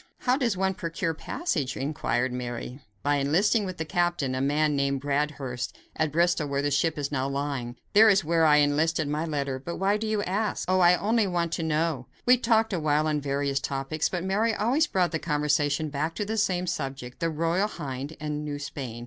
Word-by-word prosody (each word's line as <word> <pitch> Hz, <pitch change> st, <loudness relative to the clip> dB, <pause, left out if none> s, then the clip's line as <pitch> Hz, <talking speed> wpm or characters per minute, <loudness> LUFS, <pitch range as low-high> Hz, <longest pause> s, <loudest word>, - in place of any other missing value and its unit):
"How 250 Hz, 0 st, +3 dB
does 240 Hz, -8 st, 0 dB
one 190 Hz, 0 st, +1 dB
procure 165 Hz, -1 st, -3 dB
passage?" 155 Hz, -, -2 dB
inquired 130 Hz, -3 st, -1 dB
Mary. 125 Hz, +1 st, -5 dB, 0.2 s
"By 145 Hz, +1 st, +2 dB
enlisting 190 Hz, -, +2 dB
with 185 Hz, -, -6 dB
the 160 Hz, -, -3 dB
captain, 175 Hz, -4 st, 0 dB
a 130 Hz, -, -1 dB
man 150 Hz, +2 st, +2 dB
named 140 Hz, 0 st, 0 dB
Bradhurst, 140 Hz, -3 st, -2 dB, 0.2 s
at 155 Hz, -1 st, 0 dB
Bristol, 170 Hz, -1 st, +2 dB
where 140 Hz, 0 st, -1 dB
the 145 Hz, -, 0 dB
ship 150 Hz, +3 st, +1 dB
is 145 Hz, -1 st, -3 dB
now 135 Hz, -1 st, -1 dB
lying. 140 Hz, -4 st, -3 dB, 0.2 s
There 220 Hz, +2 st, +8 dB
is 195 Hz, -2 st, +4 dB
where 165 Hz, +1 st, +2 dB
I 150 Hz, -2 st, +6 dB
enlisted 150 Hz, +1 st, +2 dB
by 155 Hz, +2 st, -1 dB
letter. 140 Hz, -4 st, -2 dB
But 170 Hz, +6 st, -5 dB
why 195 Hz, +2 st, +1 dB
do 220 Hz, +1 st, -3 dB
you 215 Hz, -1 st, 0 dB
ask?" 205 Hz, +1 st, -1 dB
"Oh! 185 Hz, +1 st, +3 dB
I 175 Hz, 0 st, +6 dB
only 220 Hz, +2 st, +1 dB
wanted 170 Hz, -2 st, -1 dB
to -, -, -3 dB
know." 155 Hz, -5 st, 0 dB, 0.2 s
We 250 Hz, +1 st, +6 dB
talked 225 Hz, -3 st, +2 dB
awhile 155 Hz, -3 st, +1 dB
on 150 Hz, -1 st, 0 dB
various 140 Hz, 0 st, -1 dB
topics, 140 Hz, +3 st, -2 dB
but 180 Hz, -2 st, -3 dB
Mary 210 Hz, +4 st, +1 dB
always 260 Hz, +9 st, +2 dB
brought 180 Hz, -2 st, +1 dB
the 160 Hz, -, -1 dB
conversation 150 Hz, -1 st, 0 dB
back 150 Hz, +3 st, -2 dB
to 210 Hz, -, -2 dB
the 220 Hz, +2 st, -2 dB
same 185 Hz, -4 st, +1 dB
subject, 135 Hz, -7 st, -4 dB
the 165 Hz, -1 st, 0 dB
Royal 165 Hz, +5 st, +1 dB
Hind 140 Hz, -4 st, -6 dB
and 150 Hz, -1 st, -3 dB
New 145 Hz, -1 st, -4 dB
Spain. 135 Hz, -5 st, -6 dB
155 Hz, 205 wpm, -27 LUFS, 140-185 Hz, 0.2 s, There